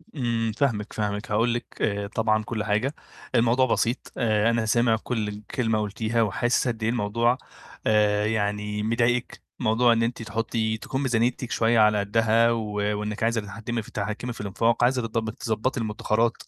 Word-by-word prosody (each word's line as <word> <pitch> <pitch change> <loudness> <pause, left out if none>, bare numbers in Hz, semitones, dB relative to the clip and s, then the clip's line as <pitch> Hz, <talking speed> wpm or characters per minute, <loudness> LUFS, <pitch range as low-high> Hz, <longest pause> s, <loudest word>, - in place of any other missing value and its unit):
إمم، 115 -4 0
فاهمِك، 115 -7 0
فاهمِك، 105 -1 -3
هاقول 115 +3 +2
لِك، 120 - -3 0.2
آآ، 100 -1 0
طبعًا 110 0 +1
كل 110 -1 -3
حاجة، 110 +8 0 0.4
الموضوع 120 +2 +4
بسيط، 120 +1 -1
آآ، 110 -1 +2
أنا 115 -1 +1
سامع 120 +1 +3
كل 110 -4 -2
ال 105 0 -7
كلمة 110 -3 0
قُلتيها 110 +2 -1
وحاسِس 120 +5 +1
قد 115 -2 -2
إيه 110 - +2
الموضوع، 115 +2 +1 0.5
آآ، 105 -1 +3
يعني 105 -1 -1
مضايقِك، 120 +2 0 0.2
موضوع 120 0 +3
إن 115 0 +1
أنتِ 120 0 -2
تحطّي 110 0 -1
تكون 135 +4 -4
ميزانيتِك 120 -1 0
شوية 115 0 +3
على 105 -1 +5
قدها 115 +3 +3
و 110 -2 -2 0.3
وإنِك 105 +1 -3
عايزة 115 -1 +1
تتحكمي 115 +3 -4
ف - - -13
تتحكمي 110 +4 -4
في - - -8
الإنفاق، 115 +4 +1
عايزة 125 0 +3
تض 110 0 -2
تضبطي 115 +2 -2
المُدخرَّات، 110 +1 0
115 Hz, 165 wpm, -25 LUFS, 105-120 Hz, 0.5 s, على